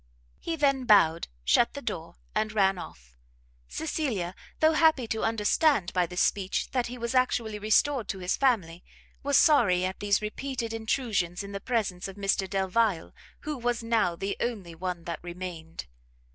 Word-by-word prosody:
He 335 - -3
then 275 -4 +1
bowed, 180 -7 +4 0.2
shut - - +3
the - - -4
door, - - -5 0.2
and 215 0 0
ran 195 -3 +2
off - - -11 0.5
Cecilia, 245 - -2 0.3
though 315 0 +5
happy 315 -5 +4
to 220 - -1
understand 225 - +2
by 180 -2 +2
this 180 +1 -2
speech 195 -1 0
that 250 -2 0
he 250 +1 -7
was 235 0 -3
actually 235 -4 +1
restored 220 +3 +2
to - - -3
his 180 0 -1
family, 190 -11 0 0.4
was 280 -1 +2
sorry 215 - +4
at 190 +1 -4
these 205 0 +2
repeated 230 +2 -4
intrusions 220 -6 -1
in 200 - -8
the 200 0 -5
presence 200 -7 -1
of 195 - -9
Mr 195 -1 0
Delvile, 195 -1 0 0.3
who 305 0 -4
was 240 -1 -1
now 225 -7 +1
the 195 +3 -3
only 205 -8 -3
one 175 0 -4
that 170 - -5
remained. 175 -2 -7
210 Hz, 165 wpm, -28 LUFS, 180-245 Hz, 0.5 s, though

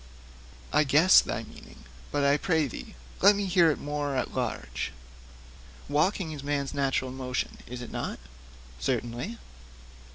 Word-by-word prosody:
'I 150 +1 +4
guess 150 +7 +7
thy - - -3
meaning, - - -14 0.3
but 145 - 0
I 140 0 +5
pray 160 0 +1
thee 125 - -8 0.3
let 205 - +7
me 200 0 -1
hear 170 -4 +4
thee - - -12
more 145 -1 -2
at 130 - -2
large.' 65 - -3 1.0
'Walking 160 +4 +1
is 145 -2 -7
man's 140 -1 -1
natural 135 -2 0
motion, 130 -1 -3
is 125 0 -6
it - - -9
not?' - - -3 0.6
'Certainly.' 120 - -2
145 Hz, 140 wpm, -28 LUFS, 130-155 Hz, 1.0 s, guess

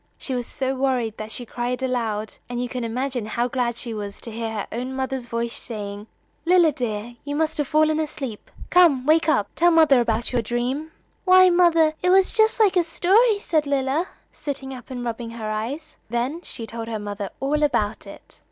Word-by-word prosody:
She 265 - -5
was 245 -2 -2
so 265 -2 -2
worried 255 -5 0
that 215 0 -6
she 245 +2 -5
cried 245 +2 -3
aloud, 225 -4 -2 0.2
and 245 0 -3
you 245 - -1
can 250 0 -4
imagine 245 0 -2
how 235 +2 0
glad 245 -2 -1
she 235 -2 -4
was 205 -2 -6
to 230 - -8
hear 225 0 -3
her 215 -2 -4
own 250 +3 -4
mother's 265 -2 -3
voice 235 0 -2
saying: 205 -2 -6 0.4
"Lilla, 345 -2 +5
dear, 235 -2 -4
you 285 0 -4
must 315 0 0
have 290 - 0
fallen 310 +1 +3
asleep. 275 -8 -5 0.2
Come, 330 -8 +5
wake 315 +2 +4
up! 210 -10 +2
Tell 345 +1 +4
mother 315 -6 +5
about 230 0 -1
your 245 - +2
dream." 245 +7 -2 0.3
"Why, 370 -1 +7
mother, 335 -3 +4
it 360 - +2
was 380 +1 +4
just 440 0 +3
like 415 -4 +4
a 355 - +4
story," 400 +7 +3
said 315 -7 0
Lilla, 280 +5 0 0.2
sitting 270 -2 -5
up 250 -2 -11
and 245 -2 -5
rubbing 235 0 -4
her 225 -2 -5
eyes. 275 +9 -5
Then 245 +8 -2
she 230 - -8
told 225 0 -6
her 225 -1 -3
mother 205 -1 -5
all 295 +3 0
about 235 -7 0
it. - - -13
255 Hz, 200 wpm, -23 LUFS, 230-310 Hz, 0.4 s, Why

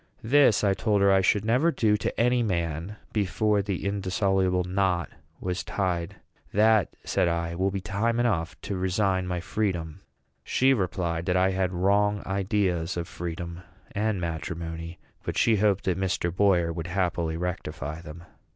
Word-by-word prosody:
This, 125 -2 +4
I 100 -2 +4
told 105 0 +1
her, 100 - +5
I 95 0 +5
should 100 +2 +2
never 130 +9 +3
do 110 -7 +2
to 105 - -3
any 125 +1 +3
man 85 -2 -2 0.2
before 105 +1 +1
the 100 -2 -3
indissoluble 95 -2 +1
knot 90 -3 0 0.3
was 90 0 -3
tied. 90 -4 -2 0.4
"That," 110 -3 +3
said - - +1
I, 85 0 -1
"will 95 +3 +1
be 95 0 -3
time 100 +6 0
enough 90 -8 0
to 100 - -4
resign 95 0 0
my 90 -1 -2
freedom." 85 -5 -2 0.4
She 135 +1 +3
replied, 90 -5 -1
that 90 0 +2
I 95 +1 +3
had 95 -1 0
wrong 100 +3 +2
ideas 95 -3 0
of 85 -1 -3
freedom 85 0 -6 0.3
and 105 -1 -1
matrimony; 85 0 -5 0.2
but - - -4
she 110 -2 +4
hoped 100 -1 +2
that 95 0 0
Mr. 90 -2 -1
Boyer 90 -4 +3
would 85 0 -5
happily 85 -3 -1
rectify 85 -4 -4
them. 85 +1 -10
95 Hz, 160 wpm, -27 LUFS, 85-105 Hz, 0.4 s, her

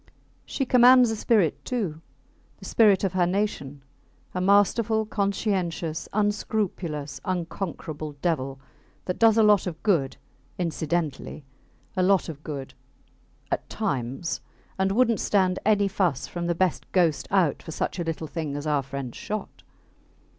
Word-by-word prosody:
She 270 - -2
commands 250 -1 +6
a - - -1
spirit, 210 -7 +1
too 190 -11 -3 0.6
the - - -12
spirit 210 -4 +4
of 190 -2 0
her 180 -2 +2
nation; 175 -8 -2 0.5
a 180 - -2
masterful, 210 +3 +3
conscientious, 190 -6 -2
unscrupulous, 195 -8 -2
unconquerable 165 -4 -4
devil... 140 -3 -2 0.5
that 180 - -3
does 225 -1 +5
a 225 - +6
lot 210 -3 +4
of 165 -3 -6
good 165 -11 +1 0.4
incidentally... 160 -3 -2 0.5
a 185 - +1
lot 190 -1 +3
of 150 -3 -8
good... 140 -3 -6 0.8
at - - -2
times 130 +6 -2 0.4
and 190 0 +2
wouldnt 230 +1 +3
stand 185 -2 +2
any 205 -2 +4
fuss 180 -8 0
from 175 -1 -4
the 170 - 0
best 185 0 -1
ghost 170 -5 +2
out 180 -8 +2
for - - -12
such 160 - -3
a - - 0
little 165 -1 -3
thing 155 -2 -4
as 145 +1 -5
our 150 -2 +1
friends 135 -2 -6
shot. 210 -1 -6
180 Hz, 140 wpm, -26 LUFS, 155-205 Hz, 0.8 s, commands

